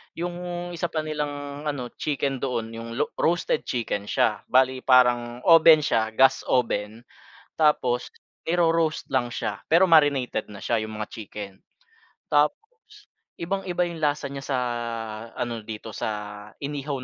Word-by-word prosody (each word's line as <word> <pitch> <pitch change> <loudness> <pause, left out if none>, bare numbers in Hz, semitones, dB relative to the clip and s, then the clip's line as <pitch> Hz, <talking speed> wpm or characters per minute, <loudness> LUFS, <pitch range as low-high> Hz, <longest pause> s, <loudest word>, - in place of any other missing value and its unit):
'Yong 175 0 -4
isa 175 0 -2
pa 155 -2 -3
nilang 145 -1 -4
ano 130 -5 -3
chicken 140 -2 -1
doon 120 -4 -2
'yong 115 0 -7
lo 150 +4 -1
roasted 170 -2 +1
chicken 105 -4 -2
siya, - - +1
bale 130 0 +3
parang 125 -1 +3
oven 165 -2 +7
siya, 110 -6 +1
gas 135 +2 +5
oven 115 -3 0 0.5
tapos 130 -6 +2 0.3
i-ro-roast 165 -1 +1
lang 120 -2 0
siya, - - -4
pero 180 +3 +6
marinated 145 -9 +3
na 100 - -9
siya 115 +1 0
'yong 110 - -6
mga 105 - -3
chicken. 105 -2 -8 0.8
Tapos - - +4 0.8
ibang-iba 180 0 -2
'yong 170 -2 -4
lasa 145 -2 0
niya 140 -1 -6
sa 135 - 0 0.8
ano 120 -1 -3
dito 110 0 -8
sa 105 -1 -5 0.2
inihaw 140 -2 -4
135 Hz, 135 wpm, -25 LUFS, 115-160 Hz, 0.8 s, oven